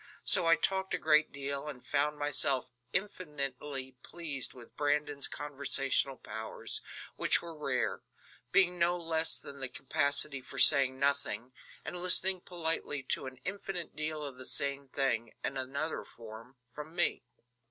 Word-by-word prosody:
So 170 - +4
I 165 - +6
talked 190 +1 0
a - - +1
great 155 0 +3
deal 140 +1 -3
and 130 -4 -8
found 150 +1 -1
myself 135 -3 +4 0.2
infinitely 145 -8 -3
pleased 155 -6 -4
with 120 -2 -15
Brandon's 145 -1 0
conversational 135 -1 0
powers, 110 +1 -3 0.4
which - - +3
were 170 -1 -9
rare; 140 -4 -2 0.5
being 180 +1 +3
no 175 +1 +1
less 165 -1 +1
than 140 0 -9
the 130 -1 0
capacity 140 +1 0
for - - -11
saying 135 -3 +8
nothing, 140 -2 -2 0.3
and 180 - -3
listening 185 0 +5
politely 165 -5 -1
to 135 - -4
an 130 0 -10
infinite 190 -4 -5
deal 155 0 -2
of 135 -3 -8
the 130 - -4
same 140 0 -1
thing, 125 -4 -2
in 135 - -3
another 140 +4 -3
form, 115 +3 -13 0.2
from 150 +2 -10
me. 175 -1 +1
140 Hz, 145 wpm, -30 LUFS, 135-160 Hz, 0.5 s, saying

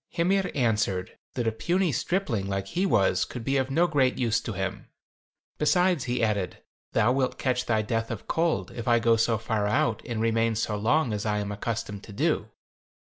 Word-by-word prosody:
Hymir 190 +3 +1
answered, 105 -7 0 0.2
that 120 - -1
a 115 - +2
puny 175 +9 0
stripling 135 - -1
like 95 0 -3
he 185 +3 0
was 95 - +3
could 125 - -6
be 135 +3 +1
of 130 0 0
no 165 +6 +3
great 140 -6 +2
use 115 -2 +1
to 110 - -5
him. 95 +1 -4 0.7
'Besides,' 180 -1 +2
he 125 -1 -1
added, 100 -4 0 0.4
'thou 115 +2 +3
wilt 130 0 0
catch 125 -1 -1
thy 110 -2 +2
death 115 +1 -2
of 115 -4 -6
cold 165 0 0
if 115 - -7
I 120 -1 +5
go 115 0 +3
so 115 0 +2
far 110 -1 -1
out 110 +1 +1
and 115 -2 -4
remain 115 0 +1
so 105 -1 -1
long 115 +4 +1
as 105 -1 -2
I 105 -1 0
am 105 0 -3
accustomed 105 -1 -4
to 105 - -11
do.' - - 0
115 Hz, 195 wpm, -27 LUFS, 105-135 Hz, 0.7 s, I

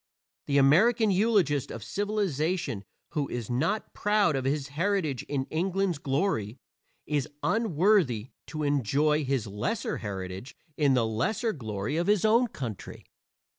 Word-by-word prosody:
The 140 - +2
American 205 - +5
eulogist 185 - +2
of 110 - -7
civilization 185 - -1 0.3
who 150 -3 -2
is 120 -1 -4
not 165 - -1
proud 205 -6 +2
of 130 -1 -2
his 140 +1 -1
heritage 160 - 0
in 135 -2 -1
England's 180 0 0
glory 135 - -1 0.5
is 145 -3 -1
unworthy 175 - +2 0.2
to 155 -1 -4
enjoy 145 +2 +2
his 135 -4 -1
lesser 105 - -2
heritage 95 +3 -6 0.2
in 140 -3 +3
the 120 -3 +2
lesser 200 - -1
glory 110 - -3
of 170 - 0
his 210 -1 +3
own 230 +3 +4
country. 120 - -7
150 Hz, 130 wpm, -28 LUFS, 130-195 Hz, 0.5 s, American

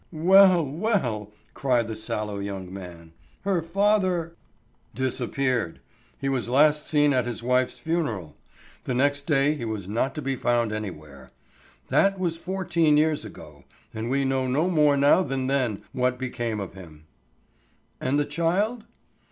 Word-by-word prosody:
"Well, 180 +1 +6
well," 135 - -1 0.2
cried 125 -4 +1
the 110 - -4
sallow 105 -1 -4
young 95 -2 -6
man, 85 -4 -10 0.3
"her 190 -3 0
father——" 185 -1 +1 0.6
"Disappeared. 130 -6 -1 0.4
He 135 - -3
was 130 -3 -1
last 150 +3 +3
seen 145 -2 +3
at 125 -2 +1
his 120 -1 -5
wife's 125 +1 +1
funeral; 145 - -3 0.5
the 125 - -2
next 145 +2 +1
day 145 -1 +3
he 145 -6 -6
was 110 -5 -4
not 115 +6 -1
to 150 - -4
be 135 0 -1
found 120 -3 +1
anywhere. 75 -11 -7 0.6
That 195 0 +3
was 175 -3 -1
fourteen 170 -4 +1
years 155 -2 +2
ago, 75 -8 -12 0.3
and 110 +2 -4
we 135 +1 +1
know 130 -1 0
no 155 +8 +1
more 150 -4 +4
now 145 +6 +5
than 135 -5 -2
then 130 -6 0
what 125 -1 0
became 120 -4 -3
of 100 - -6
him." 80 -5 -13 0.9
"And 135 +3 0
the 145 - +1
child?" 185 +10 -1
135 Hz, 150 wpm, -25 LUFS, 110-160 Hz, 0.9 s, Well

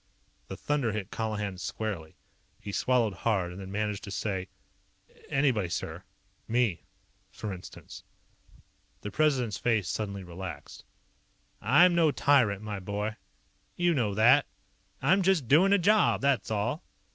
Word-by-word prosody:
The - - -7
thunder 140 -7 -1
hit 105 -3 -4
Colihan 105 -4 -3
squarely. 95 -7 -5 0.4
He 100 - -7
swallowed 120 -1 +1
hard, 95 -3 -1
and 90 +2 -8
then 95 0 -8
managed 105 0 -2
to - - -8
say: 95 -2 -3 0.8
"Anybody, 130 -10 +1
sir. - - -4 0.5
Me, 115 -6 0 0.4
for 105 -2 -6
instance." 90 - -11 1.0
The 105 - -6
President's 130 -6 +1
face 110 -7 +1
suddenly 100 0 -3
relaxed. 90 -3 -8 0.8
"I'm 160 - +5
no 170 -2 +4
tyrant, 120 -9 +2
my 105 -2 -4
boy. 105 +3 -3 0.6
You 175 -1 +2
know 110 -9 0
that. 125 +7 +5 0.6
I'm 190 +8 +4
just 180 -8 +2
doing 170 - +5
a 200 - +6
job, 210 +4 +3
that's 140 -2 +1
all." 110 - -1
110 Hz, 135 wpm, -29 LUFS, 100-140 Hz, 1.0 s, a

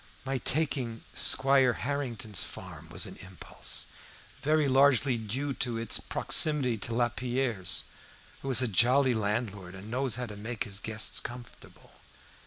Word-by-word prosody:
My 135 -1 -1
taking 135 -6 -1
Squire 135 -2 +4
Harrington's 120 -7 -2
farm 85 -3 -8
was 85 +1 0
an - - -7
impulse, 95 -1 -2 0.6
very 155 0 +2
largely 135 -1 +4
due 125 +6 -3
to 120 -3 -2
its 115 -2 +1
proximity 145 -6 +2
to 115 +2 -2
Lapierre's, 120 -4 -1 0.6
who 135 - -4
is 130 0 +5
a - - +1
jolly 125 +5 +4
landlord 105 -4 -2
and 100 +4 -9
knows 130 -2 0
how 125 +1 -3
to 105 -3 -8
make 110 +2 -4
his 100 -4 -4
guests 110 0 -2
comfortable. 120 0 -11
120 Hz, 140 wpm, -29 LUFS, 105-135 Hz, 0.6 s, is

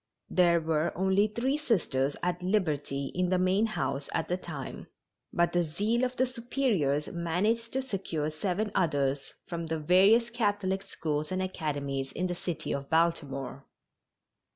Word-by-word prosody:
There 175 -2 +5
were 160 0 0
only 190 +3 +3
three 255 +7 -1
Sisters 145 - +1
at 180 0 0
liberty 155 -8 0
in 180 0 +1
the 185 - +3
main 185 +4 +3
house 140 -10 -2
at 165 - 0
the 180 - +2
time, 160 -7 -7 0.4
but 170 0 +2
the 175 0 +3
zeal 205 +10 0
of 255 0 0
the 260 - +3
Superiors 235 - 0
managed 195 +8 0
to 265 0 0
secure 175 - -2
seven 195 +6 -1
others 145 -6 0
from 170 -1 -4
the 160 0 -1
various 195 +9 +5
Catholic 205 -4 0
schools 155 -5 -3
and 185 - 0
academies 145 -7 -2
in 180 - -1
the 180 - -1
city 175 -2 -3
of 140 0 -4
Baltimore. 140 -5 0
175 Hz, 155 wpm, -29 LUFS, 150-205 Hz, 0.4 s, There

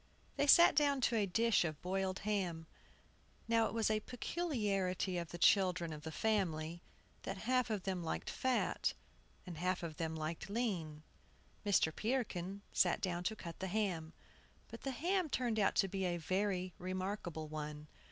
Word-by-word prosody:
They 285 - +1
sat 340 +4 +8
down 285 -2 +3
to 240 - +2
a 210 -3 +2
dish 225 +2 +3
of 155 -3 -3
boiled 190 +1 -1
ham. 180 -6 -1 0.8
Now 230 -1 +3
it - - -6
was 225 -1 +2
a 215 - +2
peculiarity 205 - -1
of 170 -2 -5
the 175 - -6
children 180 -3 +3
of 150 - -8
the 160 +1 -6
family, 170 -5 0 0.4
that 195 - -4
half 255 0 +2
of 210 -4 -2
them 185 -3 -2
liked 160 - -3
fat, 260 -1 0 0.5
and 175 -4 -7
half 180 +1 0
liked 160 +1 -4
lean. 180 -10 -2 0.6
Mr. 195 -6 +3
Peterkin 200 -5 -2
sat - - +3
down 180 -3 -2
to 220 - 0
cut 170 -5 -8
the 190 - -2
ham. 180 -5 -1 0.6
But 230 - -9
the 275 - -3
ham 345 +6 0
turned 240 -5 0
out 200 - +3
to 195 - +3
be 190 0 -2
a 175 -1 0
very 185 +2 -1
remarkable 185 -3 -3
one. 150 -1 -5
190 Hz, 160 wpm, -36 LUFS, 170-220 Hz, 0.8 s, sat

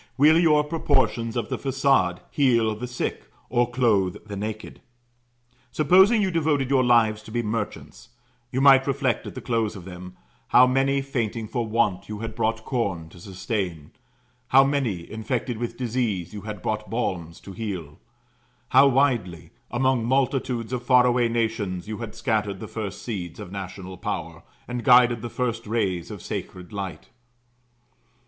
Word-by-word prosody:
Will 155 +4 +6
your 155 -3 +4
proportions 135 -6 0
of 115 -2 -2
the - - -3
façade 135 -10 +1
heal 115 -6 +3
the 125 +4 -5
sick, 125 0 -4 0.2
or 120 0 +2
clothe 110 -7 +1
the 105 -2 -7
naked? 105 +2 -6 0.9
Supposing 190 +8 +5
you 190 - 0
devoted 150 -5 +1
your 130 -2 +4
lives 115 -3 +3
to 110 - -13
be 120 +1 -1
merchants, 105 -5 -5 0.4
you 130 - -1
might 135 -1 +6
reflect 135 -2 0
at - - -8
the - - -6
close 115 -3 -1
of 90 -3 -10
them, 90 0 -10 0.3
how 125 - +7
many, 135 +2 +1
fainting 115 -4 -3
for 115 +1 -2
want, 110 -5 0
you 105 - -4
had 115 +1 -5
brought 110 +1 -1
corn 95 -10 -2
to 90 - -15
sustain; 95 - -4 0.6
how 135 +2 +6
many, 130 -11 -1
infected 110 +2 -3
with 120 -1 -4
disease, 115 -8 -2
you 105 - -6
had 105 -2 -7
brought 110 -1 -2
balms 90 -7 -3
to 100 - -10
heal; 95 -8 -6 0.7
how 135 +2 +7
widely, 120 - +1 0.2
among 130 0 +1
multitudes 125 -1 0
of 125 - -2
far 125 0 +5
away 120 -1 +2
nations, 110 -6 -2
you 110 -1 -5
had 115 -2 -7
scattered 110 -3 -1
the - - -7
first 105 -3 -6
seeds 90 -8 -5
of 90 - -8
national 95 -1 -7
power, 85 0 -4 0.3
and 125 -1 -4
guided 120 -3 +5
the 120 - -5
first 115 -3 -3
rays 95 -6 -1
of - - -8
sacred 90 0 -6
light. 100 -3 -6
115 Hz, 160 wpm, -24 LUFS, 100-130 Hz, 0.9 s, how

